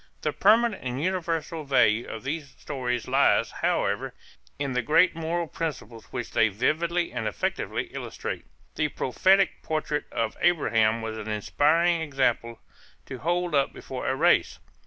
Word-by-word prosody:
The - - 0
permanent 230 -2 +3
and 125 0 -3
universal 165 -2 -2
value 125 -5 +3
of 110 - -7
these 140 0 -5
stories 125 -5 -3
lies, - - +3
however, - - -1 0.4
in 140 -2 -2
the 125 - +1
great 165 +8 +4
moral 165 +1 -2
principles 135 -9 -5
which 125 -2 -6
they 115 - +4
vividly 165 - 0
and 120 -3 -2
effectively 105 - -2
illustrate. - - -5 0.3
The 155 - 0
prophetic 190 +8 +2
portrait 155 -1 -2
of 115 -1 -2
Abraham 115 -9 +2
was 110 0 -4
an 110 - -7
inspiring 160 - +2
example 125 -6 0 0.5
to 130 - -7
hold 175 +3 -1
up 140 -2 +2
before - - -6
a - - +1
race. - - +3
145 Hz, 145 wpm, -26 LUFS, 120-165 Hz, 0.5 s, great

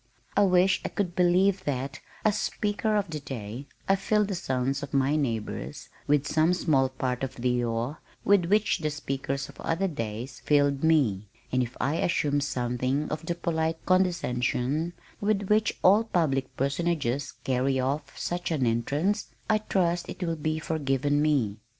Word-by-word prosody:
I 205 - +4
wish 185 0 +4
I - - -2
could 180 -4 -2
believe 185 +2 +3
that 135 -1 -2 0.3
as 210 -1 +4
"Speaker 210 +1 0
of 200 -4 0
the 155 - -3
Day," 125 -1 -6 0.2
I 195 - +5
filled 210 +1 +1
the - - -1
sons 135 -4 -1
of 140 -1 -5
my 135 +2 +3
neighbors 110 - -3 0.2
with 145 -1 +3
some 160 +4 +3
small 135 -7 +2
part 130 -1 -2
of 135 - -3
the 125 0 0
awe 120 +5 -2 0.3
with 200 -3 +5
which 205 +3 +2
the 155 -2 -1
speakers 135 -2 -3
of - - -13
other 175 +4 0
days 120 - -5
filled 145 -1 +2
me, 125 -12 +3 0.2
and 130 - +2
if 125 +1 -4
I 145 +4 0
assumed 145 -4 +1
something 130 +2 -1
of 155 +2 -4
the 170 - 0
polite 160 -1 -1
condescension 160 -4 +1 0.3
with 205 -1 +1
which 210 0 +2
all 205 +4 +6
public 150 -11 0
personages 140 -2 -1
carry 130 +1 +1
off 140 +2 -2
such 175 0 -2
an 150 -6 +1
entrance, 140 - 0 0.2
I 215 - +4
trust 175 -4 0
it - - -5
will 165 -1 -1
be 155 0 -1
forgiven 145 -2 0
me. 135 -9 +1
145 Hz, 165 wpm, -27 LUFS, 130-175 Hz, 0.3 s, all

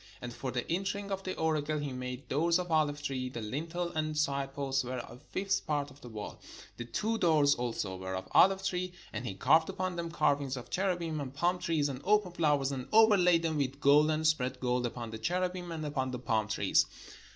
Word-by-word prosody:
And 120 -1 -6
for 130 - -4
the 125 -1 -3
entering 200 +3 -2
of 195 0 -2
the 185 -1 -4
oracle 155 -1 0
he 145 -3 -3
made 125 +1 -6
doors 165 +5 +2
of 180 -1 -4
ohve 155 -2 +2
tree: 130 -3 -2
the 125 - -6
lintel 165 +10 -3
and 155 -2 -2
side 140 -2 0
posts 135 -1 -1
were 125 +1 -4
a 120 0 -8
fifth 195 +1 -1
part 145 -2 -1
of 140 +2 -17
the 120 - -10
wall. 105 -2 -7 0.4
The 120 - -5
two 220 - -1
doors 150 -4 +4
also 115 -7 -3
were 95 0 -4
of 95 0 -5
oHve 195 0 +5
tree; 180 -1 -2 0.2
and 115 +3 -4
he 95 - -4
carved 160 +11 +4
upon 185 -1 -3
them 170 -1 -3
carvings 140 -5 +1
of 125 - -9
cherubim 175 -5 -1
and 135 -2 -5
palm 175 +6 0
trees 165 -5 +1
and 135 -2 -5
open 210 -2 +3
flowers, 150 -5 +1
and 130 -2 -4
overlaid 195 -6 +5
them 160 -2 0
with 140 -1 -1
gold, 145 +2 +5
and 155 0 0
spread 130 -5 +1
gold 125 -1 0
upon 115 -1 -6
the 110 - -6
cherubim, 180 +5 -2
and 160 -2 -4
upon 135 -3 -1
the 125 - -4
palm 110 -3 0
trees. 105 - +2
145 Hz, 220 wpm, -31 LUFS, 130-175 Hz, 0.4 s, oHve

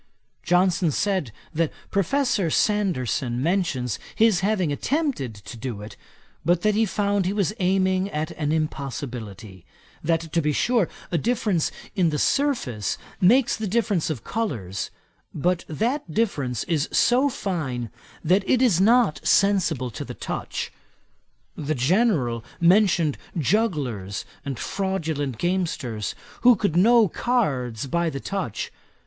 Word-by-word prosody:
Johnson 180 -1 +2
said, 185 - 0 0.2
that 160 0 0 0.2
Professor 200 - +1
Sanderson 145 - 0
mentions 145 - 0 0.2
his 220 -5 +4
having 190 -5 +1
attempted 255 - -1
to 105 +4 -10
do 115 -3 -5
it, 105 - -9 0.5
but 175 +1 +2
that 215 0 +3
he 220 +1 +2
found 200 -3 0
he 195 - 0
was 205 -1 0
aiming 190 +1 +2
at 155 -3 -3
an 150 -1 -2
impossibility; 120 - -4 0.4
that 165 +1 +2
to 170 - +3
be 150 -1 +1
sure 235 - +2 0.2
a 170 - +1
difference 210 -5 0 0.2
in 175 -3 +3
the 150 - -1
surface 190 - 0 0.2
makes 240 +7 +4
the 220 -1 -3
difference 205 -5 +1
of 135 -8 -4
colours; 110 - -3 0.5
but 175 +3 0
that 230 - -1
difference 145 - 0
is 160 -4 0
so 255 +4 +4
fine, 135 - -3 0.3
that 185 +5 +3
it 255 - +4
is 225 -9 +4
not 220 - +4
sensible 175 -11 +2
to - - -6
the - - -8
touch. - - -4 0.8
The 155 0 -2
General 135 - +2 0.2
mentioned 170 -4 +4 0.2
jugglers 140 - 0 0.2
and 140 -3 -4
fraudulent 160 - -2
gamesters, 160 - -2 0.3
who 245 0 +7
could 200 -5 -1
know 225 +4 +6
cards 140 - -1
by 170 +4 0
the 135 -3 -5
touch. 185 - -4
170 Hz, 130 wpm, -24 LUFS, 135-205 Hz, 0.8 s, who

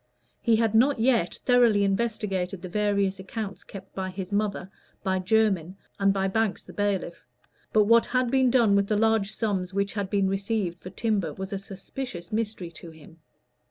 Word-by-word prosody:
He 230 - +3
had 225 -1 +1
not 250 +4 +4
yet 230 -7 +2
thoroughly 240 -5 +5
investigated 195 -3 -1
the 185 - -5
various 200 -1 0
accounts 195 0 -6
kept 195 -1 -11
by 190 -1 -3
his 185 +1 -6
mother, 200 -2 -1 0.3
by 190 -1 0
Jermyn, 190 -3 +1 0.2
and 195 0 +4
by 195 0 0
Banks 215 +1 0
the - - -13
bailiff; 200 -4 -2 0.5
but 215 - +5
what 230 +2 +4
had 255 -1 0
been 260 -1 +4
done 235 -5 +4
with 200 0 +2
the 210 - +1
large 220 -2 +2
sums 195 -5 -2
which 200 0 0
had 200 -2 -3
been 200 -1 +2
received 195 -2 -2
for 185 - -8
timber 200 -8 -1
was 190 +2 -6
a 195 - -2
suspicious 195 -1 -7
mystery 215 -5 -3
to 165 0 -11
him. 160 0 -16
200 Hz, 180 wpm, -26 LUFS, 190-220 Hz, 0.5 s, thoroughly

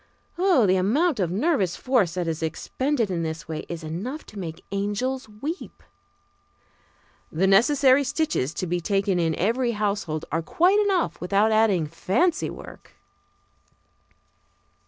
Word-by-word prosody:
The 315 - +3
amount 275 - +1
of 180 -4 +1
nervous 200 - 0
force 235 - +1
that 180 -2 -2
is 165 -1 -3
expended 230 - -1
in 170 -2 -1
this 160 0 -5
way 160 -1 -5
is 170 -1 -6
enough 200 - -5
to 205 - -7
make 165 -3 -7
angels 220 +5 -2
weep. 280 - -7 1.5
The 170 +5 +1
necessary 260 +7 +5
stitches 280 - -1
to - - -2
be 175 0 -2
taken 195 0 0
in 165 -2 +1
every 235 +5 0
household 200 -7 -2
are 165 - 0
quite 360 - +3
enough 390 -4 0
without 200 +4 +2
adding 215 -7 +3
fancy 200 - 0
work. - - -11
205 Hz, 135 wpm, -24 LUFS, 175-265 Hz, 1.5 s, necessary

